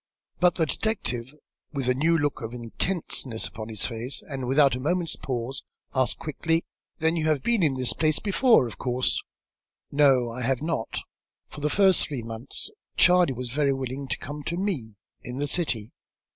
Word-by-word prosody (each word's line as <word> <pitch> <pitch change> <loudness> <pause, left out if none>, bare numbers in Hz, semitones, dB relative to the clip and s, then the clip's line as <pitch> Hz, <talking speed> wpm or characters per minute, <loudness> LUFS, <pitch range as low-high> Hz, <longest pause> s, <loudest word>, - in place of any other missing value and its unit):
But 180 -1 +4
the 165 - +2
detective, 130 - -2 0.4
with 135 -3 -1
a 125 - +4
new 160 +6 +3
look 145 -2 0
of 115 +1 -5
intentness 125 -1 -2
upon 110 0 -7
his 110 -3 -2
face, 115 +4 -3
and 135 -4 -5
without 140 +1 +5
a 125 - -2
moment's 165 +4 0
pause, 125 0 -3 0.3
asked 130 -3 +1
quickly. 165 +2 -1 0.3
"Then 160 0 +2
you 160 -2 0
have 150 -4 +2
been 235 -4 +2
in 150 -5 +3
this 130 -1 +1
place 155 -2 +2
before, 215 - +4
of 115 - -7
course?" 125 0 +1 0.7
"No, 135 -5 +4
I 125 +2 -5
have 130 +3 0
not. 160 -8 -2 0.5
For 150 - -9
the 150 - +1
first 190 +1 +4
three 135 -6 -4
months 115 - -4 0.3
Charley 180 -5 +6
was 125 -1 -5
very 140 +1 +2
willing 135 +1 -4
to - - -1
come 145 +2 -6
to 170 - -2
me, 155 - -2 0.3
in 125 +1 -6
the 145 - 0
city. 125 -9 -2
140 Hz, 180 wpm, -26 LUFS, 125-160 Hz, 0.7 s, Charley